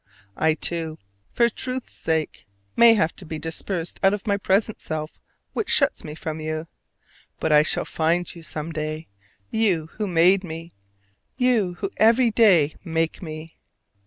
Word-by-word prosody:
I 160 Hz, 0 st, +2 dB
too, 165 Hz, -1 st, -2 dB, 0.3 s
for 235 Hz, -, +3 dB
truth's 255 Hz, +2 st, -5 dB
sake, 160 Hz, -7 st, -2 dB, 0.3 s
may 235 Hz, -1 st, +7 dB
have 165 Hz, -6 st, +1 dB
to -, -, -10 dB
be 160 Hz, -2 st, -6 dB
dispersed 165 Hz, +2 st, -4 dB
out 195 Hz, +1 st, +4 dB
of 205 Hz, -, -10 dB
my 205 Hz, -2 st, +2 dB
present 200 Hz, +2 st, 0 dB
self 155 Hz, -1 st, -5 dB, 0.3 s
which -, -, -2 dB
shuts -, -, +3 dB
me 150 Hz, -, -7 dB
from 160 Hz, 0 st, -5 dB
you: 155 Hz, 0 st, -3 dB, 0.7 s
but 160 Hz, -, 0 dB
I 150 Hz, 0 st, +7 dB
shall 155 Hz, -, 0 dB
find 170 Hz, +2 st, 0 dB
you 170 Hz, -, -11 dB
some 155 Hz, 0 st, -5 dB
day, 155 Hz, 0 st, -4 dB, 0.4 s
you 185 Hz, -8 st, +1 dB
who 210 Hz, -1 st, -1 dB
made 180 Hz, +2 st, +4 dB
me, 165 Hz, -1 st, -8 dB, 0.6 s
you 235 Hz, -8 st, +2 dB
who 195 Hz, +2 st, -4 dB
every 230 Hz, +2 st, +5 dB
day 185 Hz, -10 st, +4 dB
make 165 Hz, -2 st, -1 dB
me! 160 Hz, -1 st, -8 dB
165 Hz, 160 wpm, -24 LUFS, 160-205 Hz, 0.7 s, may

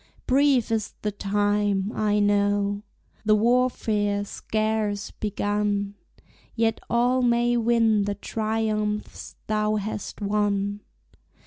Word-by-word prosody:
Brief 265 Hz, -3 st, +3 dB
is 220 Hz, -2 st, -1 dB
the 210 Hz, -, 0 dB
time, 205 Hz, 0 st, 0 dB
I 210 Hz, -1 st, +1 dB
know, 205 Hz, 0 st, +2 dB, 0.4 s
The 215 Hz, 0 st, +4 dB
warfare 215 Hz, -3 st, +1 dB
scarce 215 Hz, -1 st, -2 dB
begun; 205 Hz, -1 st, -1 dB, 0.6 s
Yet 225 Hz, -1 st, +1 dB
all 245 Hz, +2 st, +2 dB
may 240 Hz, 0 st, +2 dB
win 230 Hz, -3 st, +3 dB
the 205 Hz, 0 st, -2 dB
triumphs 215 Hz, 0 st, -2 dB
thou 215 Hz, 0 st, 0 dB
hast 210 Hz, 0 st, -4 dB
won. 205 Hz, -1 st, 0 dB
210 Hz, 100 wpm, -25 LUFS, 205-225 Hz, 0.6 s, The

